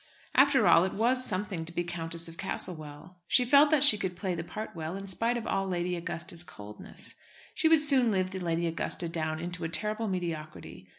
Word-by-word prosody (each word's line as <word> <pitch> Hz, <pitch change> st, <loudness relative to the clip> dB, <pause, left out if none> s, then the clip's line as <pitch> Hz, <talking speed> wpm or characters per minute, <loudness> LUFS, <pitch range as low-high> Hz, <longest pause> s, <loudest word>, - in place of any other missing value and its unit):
After 275 Hz, 0 st, +5 dB
all, 165 Hz, -, +6 dB
it 190 Hz, -, -2 dB
was 250 Hz, +4 st, +2 dB
something 185 Hz, -5 st, -2 dB
to 160 Hz, -, -6 dB
be 175 Hz, +1 st, -2 dB
Countess 170 Hz, -1 st, -4 dB
of 165 Hz, -, -10 dB
Castlewell. 170 Hz, -2 st, -4 dB
She 250 Hz, -, +3 dB
felt 285 Hz, +4 st, +6 dB
that 295 Hz, -2 st, +4 dB
she 220 Hz, -8 st, +7 dB
could 185 Hz, -2 st, -3 dB
play 185 Hz, 0 st, -3 dB
the 165 Hz, -1 st, -4 dB
part 215 Hz, +5 st, -6 dB
well, 160 Hz, +2 st, -5 dB
in 195 Hz, -, -7 dB
spite 230 Hz, +5 st, 0 dB
of 230 Hz, -, -5 dB
all 195 Hz, 0 st, -1 dB
Lady 180 Hz, -1 st, -1 dB
Augusta's 170 Hz, 0 st, -4 dB
coldness. 105 Hz, -9 st, -9 dB, 0.4 s
She 320 Hz, -, +1 dB
would 320 Hz, -2 st, +6 dB
soon 270 Hz, -5 st, +4 dB
live 185 Hz, -3 st, 0 dB
the 190 Hz, -, -5 dB
Lady 170 Hz, -1 st, -1 dB
Augusta 165 Hz, +1 st, -2 dB
down 155 Hz, -1 st, -3 dB
into 175 Hz, +1 st, -5 dB
a 165 Hz, -, -2 dB
terrible 215 Hz, +6 st, -1 dB
mediocrity. 165 Hz, -5 st, -5 dB
180 Hz, 210 wpm, -29 LUFS, 165-215 Hz, 0.4 s, she